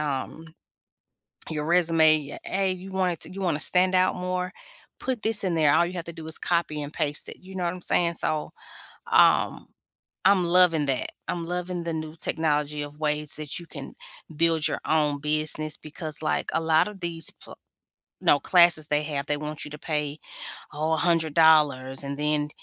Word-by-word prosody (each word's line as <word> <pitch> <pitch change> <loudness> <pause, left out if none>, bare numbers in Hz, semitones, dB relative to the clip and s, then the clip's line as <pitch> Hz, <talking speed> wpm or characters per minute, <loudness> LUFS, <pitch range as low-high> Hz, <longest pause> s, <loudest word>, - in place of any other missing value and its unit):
Um, 150 +2 -4 1.0
your 150 -1 -3
resume, 160 -4 +3
"Hey, 190 0 0
you 185 +1 -9
want 185 -2 +1
it - - -16
to 180 - -4
you 195 - -5
wanna 160 -5 0
stand 185 +2 +3
out 185 0 +3
more, 180 0 -3 0.5
put 255 -4 -3
this 220 -2 +4
in 180 - 0
there." 150 -2 +4
All 175 - +4
you 175 - -6
have 170 - -5
to 170 - -7
do 160 -1 -9
is 160 - -3
copy 170 -3 -1
and 145 +1 -7
paste 145 0 -1
it. - - -8
You 190 +1 -13
know 180 - -2
what 175 +1 -1
I'm 180 - -10
saying? 170 -1 +1
So, 155 -1 -1 0.6
um, - - +3 0.6
I'm 195 -2 +5
loving 170 -3 +4
that. 135 -2 -2 0.2
I'm 170 -1 -2
loving 180 0 -4
the 165 - -3
new 155 -1 -5
technology 150 -2 -1
of 145 +1 -9
ways 150 -1 -1
that 150 -2 -5
you 170 - -10
can 140 -4 -10 0.4
build 160 -1 +2
your - - -3
own 150 -2 +1
business 155 0 0
because 155 0 -3
like 155 - -1
a - - +1
lot 160 +3 +3
of 205 -2 -11
these 165 -2 -3
pl - - -11 0.7
no, 145 - +4
classes 170 -3 +5
they 150 0 +2
have, 145 -2 -3
they 150 - 0
want 150 0 -5
you 150 - -10
to 150 - -9
pay, 150 -1 -3 0.5
oh, 155 +2 -1
$100 155 -5 +3
and 140 0 -5
then 150 0 0
160 Hz, 190 wpm, -25 LUFS, 150-175 Hz, 1.0 s, I'm